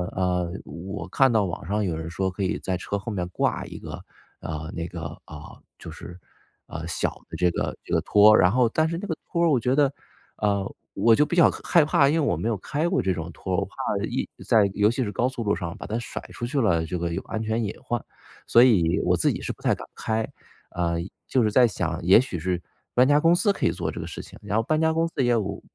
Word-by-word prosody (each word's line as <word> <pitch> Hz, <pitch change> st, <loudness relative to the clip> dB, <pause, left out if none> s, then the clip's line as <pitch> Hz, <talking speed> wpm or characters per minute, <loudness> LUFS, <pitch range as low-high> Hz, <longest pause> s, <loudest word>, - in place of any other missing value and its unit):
呃， 90 Hz, -2 st, 0 dB
我 90 Hz, +1 st, -7 dB
看 135 Hz, +6 st, +3 dB
到 110 Hz, -3 st, +3 dB
网 85 Hz, -, -5 dB
上 105 Hz, +2 st, 0 dB
有 85 Hz, -3 st, -1 dB
人 80 Hz, +1 st, -5 dB
说 95 Hz, +3 st, -1 dB
可 95 Hz, +1 st, -4 dB
以 95 Hz, -, -1 dB
在 95 Hz, -, -2 dB
车 100 Hz, +3 st, -3 dB
后 105 Hz, +3 st, -6 dB
面 90 Hz, -2 st, -2 dB
挂 -, -, -1 dB
一 -, -, -9 dB
个， -, -, -8 dB, 0.5 s
啊， 80 Hz, 0 st, -5 dB
那 85 Hz, 0 st, -4 dB
个 85 Hz, -2 st, -7 dB
啊， 75 Hz, 0 st, -11 dB, 0.2 s
就 -, -, -9 dB
是， 90 Hz, +1 st, -10 dB, 0.5 s
啊， -, -, -6 dB
小 -, -, -1 dB, 0.2 s
的 -, -, -8 dB
这 90 Hz, -, +3 dB
个 -, -, -2 dB
这 -, -, -11 dB
个 -, -, +4 dB
拖 105 Hz, +1 st, +6 dB
儿， -, -, +6 dB
然 90 Hz, 0 st, +5 dB
后 125 Hz, -1 st, +3 dB
但 155 Hz, +6 st, +1 dB
是 165 Hz, +1 st, -3 dB
那 205 Hz, -, -6 dB
个 160 Hz, -, -2 dB, 0.2 s
拖 170 Hz, -, 0 dB
儿 170 Hz, -, +4 dB
我 135 Hz, -5 st, +3 dB
觉 125 Hz, +3 st, +1 dB
得 145 Hz, -2 st, +3 dB, 0.5 s
呃， 100 Hz, -2 st, 0 dB, 0.2 s
我 115 Hz, +3 st, +4 dB
就 150 Hz, -, +4 dB
比 175 Hz, -, -3 dB
较 170 Hz, -, +6 dB
害 170 Hz, -4 st, +4 dB
怕， 145 Hz, -2 st, +4 dB
因 145 Hz, -, +2 dB
为 -, -, +2 dB
我 145 Hz, -, +1 dB
没 115 Hz, -, -2 dB
有 115 Hz, -, +1 dB
开 150 Hz, -, -2 dB
过 185 Hz, -, +1 dB
这 95 Hz, -, 0 dB
种 80 Hz, +1 st, -5 dB
拖， 95 Hz, +3 st, -3 dB
我 -, -, 0 dB
怕 -, -, -17 dB, 0.3 s
一 -, -, -3 dB, 0.2 s
在 105 Hz, -3 st, +4 dB
尤 105 Hz, +2 st, +4 dB
其 130 Hz, +1 st, -1 dB
是 105 Hz, -, -3 dB
高 120 Hz, +5 st, +1 dB
速 125 Hz, -3 st, -4 dB
路 105 Hz, -1 st, +1 dB
上 85 Hz, -3 st, -5 dB
把 -, -, -8 dB
它 110 Hz, -, -2 dB
甩 120 Hz, -, -5 dB
出 120 Hz, -, -5 dB
去 135 Hz, +2 st, 0 dB
了， 85 Hz, -7 st, +2 dB
这 90 Hz, +2 st, -3 dB
个 85 Hz, 0 st, -2 dB
有 -, -, -2 dB
安 110 Hz, -, -4 dB
全 110 Hz, +1 st, -1 dB
隐 100 Hz, -, -3 dB
患， 120 Hz, -2 st, -2 dB, 0.4 s
所 120 Hz, -, +6 dB
以 90 Hz, -10 st, +4 dB
我 -, -, +2 dB
自 -, -, +2 dB
己 -, -, -6 dB
是 -, -, -3 dB
不 -, -, -12 dB
太 -, -, +3 dB
敢 -, -, -7 dB
开。 110 Hz, 0 st, -1 dB, 0.4 s
呃， 85 Hz, -1 st, -1 dB, 0.3 s
就 130 Hz, -, +2 dB
是 105 Hz, -, +2 dB
在 125 Hz, +1 st, +6 dB
想， 85 Hz, -5 st, -2 dB
也 95 Hz, +7 st, +7 dB
许 95 Hz, -10 st, -5 dB
是 90 Hz, +1 st, -2 dB, 0.3 s
搬 125 Hz, +1 st, +5 dB
家 145 Hz, +1 st, +5 dB
公 165 Hz, +2 st, +4 dB
司 205 Hz, +3 st, +3 dB
可 -, -, -2 dB
以 85 Hz, -, +3 dB
做 85 Hz, -2 st, -3 dB
这 -, -, -7 dB
个 80 Hz, -, -5 dB
事 85 Hz, -, -7 dB
情， -, -, -13 dB
然 105 Hz, +1 st, -3 dB
后 -, -, +3 dB
搬 155 Hz, +5 st, +1 dB
家 160 Hz, 0 st, +2 dB
公 165 Hz, +1 st, +1 dB
司 -, -, -13 dB
也 120 Hz, -, +3 dB
有 100 Hz, -4 st, -1 dB
105 Hz, 285 characters per minute, -25 LUFS, 90-130 Hz, 0.5 s, 也